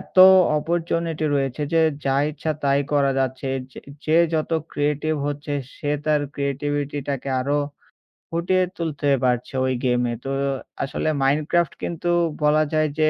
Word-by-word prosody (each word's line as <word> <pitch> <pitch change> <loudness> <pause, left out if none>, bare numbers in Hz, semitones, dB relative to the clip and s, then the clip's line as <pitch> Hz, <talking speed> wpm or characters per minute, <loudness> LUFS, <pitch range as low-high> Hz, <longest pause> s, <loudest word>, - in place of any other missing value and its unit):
এত - - -15 0.4
অপরচুনিটি 165 0 -1
রয়েছে 135 +1 -1
যে 165 - +4 0.2
যা 135 0 +2
ইচ্ছা 155 +1 -3
তাই 140 0 +3
করা 140 -1 +3
যাচ্ছে। 130 +1 -1 0.2
যে - - -11 0.3
যে 160 +1 +3 0.2
যত 155 +1 -1 0.2
ক্রিয়েটিভ 150 +1 0
হচ্ছে 145 0 -4 0.2
সে 145 - -3
তার 150 -1 +2
ক্রিয়েটিভিটি-টাকে 140 -1 -2
আরো 145 +3 0 0.7
ফুটিয়ে 180 +3 +1
তুলতে 150 -4 -1
পারছে 125 +1 0
ওই 130 - +1
গেম-এ। 125 -1 +1
তো 135 - -3 0.5
আসলে 135 +3 -2
মাইনক্রাফট 155 +5 +2
কিন্তু 170 0 -3 0.4
বলা 150 +1 +4
যায় 155 -1 +2
যে 155 0 +4
145 Hz, 140 wpm, -23 LUFS, 140-155 Hz, 0.7 s, যে